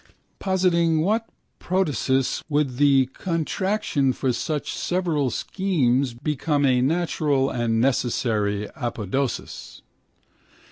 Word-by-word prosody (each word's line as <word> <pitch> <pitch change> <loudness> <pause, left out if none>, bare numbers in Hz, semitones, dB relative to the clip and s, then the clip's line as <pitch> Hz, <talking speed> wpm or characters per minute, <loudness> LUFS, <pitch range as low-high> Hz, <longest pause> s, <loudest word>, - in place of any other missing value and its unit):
Positing 170 -4 +2
what 220 +6 0 0.3
protasis 145 -8 0
would 145 -4 0
the 140 -2 +5
contraction 165 -4 -1
for 130 -1 -1
such 150 +5 -3
several 170 -7 0
schemes 135 -9 0
become 145 +2 0
a 125 -2 +3
natural 145 -2 +1
and 115 -2 0
necessary 110 -5 0
apodosis? 120 0 -4
140 Hz, 90 wpm, -24 LUFS, 125-170 Hz, 0.3 s, the